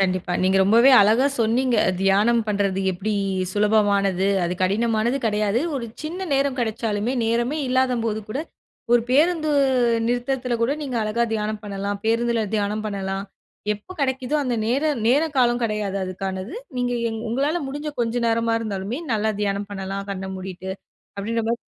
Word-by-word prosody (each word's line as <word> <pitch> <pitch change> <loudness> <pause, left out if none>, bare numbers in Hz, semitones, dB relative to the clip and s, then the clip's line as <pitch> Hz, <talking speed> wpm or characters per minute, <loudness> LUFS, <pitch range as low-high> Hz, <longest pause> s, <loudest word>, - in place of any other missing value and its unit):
கண்டிப்பா. 185 -1 0
நீங்க 190 +1 +3
ரொம்பவே 230 +7 +6
அழகா 220 +6 +4
சொன்னீங்க. 240 +2 +2 0.2
தியானம் 205 +5 +3
பண்றது 200 -2 0
எப்டி 200 +4 -3 0.4
சுலபமானது, 200 -2 +2 0.2
அது 175 +1 -1
கடினமானது 225 +5 +1
கெடயாது. 210 +1 +1
ஒரு 250 -4 -3 0.2
சின்ன 350 +5 -4
நேரம் 275 -1 +1
கெடச்சாலுமே 220 0 -1
நேரமே 240 +6 0
இல்லாத 255 -1 +2
போது 220 -1 -1
கூட, 215 - -3 0.6
ஒரு 240 - +5
பேருந்து 310 +3 +3 0.6
நிறுத்தத்துல 245 0 -1
கூட 240 +4 +2
நீங்க 260 -5 -3
அழகா 215 +2 0
தியானம் 215 0 -2
பண்ணலாம். 200 0 -4
பேருந்துல 230 0 +1
தியானம் 210 +1 -1
பண்ணலாம். 195 -1 -3 0.5
எப்ப 210 - -11
கெடைக்குதோ 260 +1 0
அந்த 250 -3 -1
நேர 255 +6 +1 0.2
நேர 280 +6 +4
காலம் 240 -1 +3
கெடையாது. 210 -3 -1
அதுக்கானது. 190 +3 -5 0.2
நீங்க 245 0 0 0.2
எங் 225 0 -5
உங்களால 285 +8 0
முடிஞ்ச 290 +3 -4
கொஞ்ச 230 0 -1
நேரமாருந்தாலுமே 230 0 -1
நல்ல 215 0 0
தியானம் 200 0 -1
பண்ணலாம். 195 0 -4
கண்ண 190 0 -5
மூடிட்டு 185 0 -7 0.5
அப்டின்றமா 225 +3 -1
220 Hz, 140 wpm, -23 LUFS, 200-245 Hz, 0.6 s, ரொம்பவே